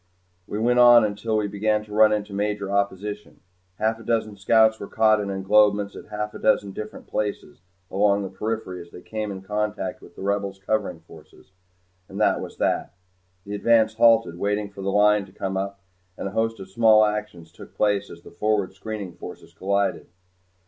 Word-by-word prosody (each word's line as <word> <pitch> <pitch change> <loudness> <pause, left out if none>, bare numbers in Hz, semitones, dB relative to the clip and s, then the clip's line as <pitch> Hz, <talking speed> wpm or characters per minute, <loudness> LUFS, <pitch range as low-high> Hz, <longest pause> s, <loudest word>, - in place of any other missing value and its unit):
We 105 - -4
went 120 +3 +2
on 120 -2 +8
until 110 +2 -2
we 105 - 0
began 105 +1 0
to 105 - -11
run 110 0 +6
into 105 -1 -2
major 100 -1 -2
opposition. 100 +1 -3 0.4
Half 110 +1 0
a - - -11
dozen 110 -2 -1
scouts 110 +3 +3
were 100 - -6
caught 110 -1 +3
in 100 - -3
englobements 100 +1 +2
at - - -11
half 105 0 -4
a - - -8
dozen 100 -2 +2
different 105 +2 -8
places 105 -4 -4 0.3
along 100 +1 +2
the 95 - -5
periphery 100 -3 -4
as 85 - -13
they 90 - -12
came 110 -1 -4
in 95 -1 -8
contact 105 +1 -3
with - - -16
the - - -8
Rebels' 100 -1 -1
covering 95 -4 -2
forces. 80 - -17 0.6
And 95 - -7
that 105 - +2
was - - -8
that. - - -1 0.5
The 100 - -6
advance 110 +1 +3
halted 115 -6 +4
waiting 105 +1 -1
for 100 - -10
the 95 0 -1
Line 105 0 +4
to - - -17
come 95 0 -4
up, 100 +1 -3 0.4
and - - -4
a - - -5
host 115 +1 -1
of 95 - -8
small 110 0 +5
actions 105 -6 -4
took 85 - -14
place 105 -1 +1
as - - -12
the - - -13
forward 105 -3 0
screening 100 -2 -6
forces - - -11
collided. 100 +1 -1
105 Hz, 190 wpm, -24 LUFS, 100-110 Hz, 0.6 s, on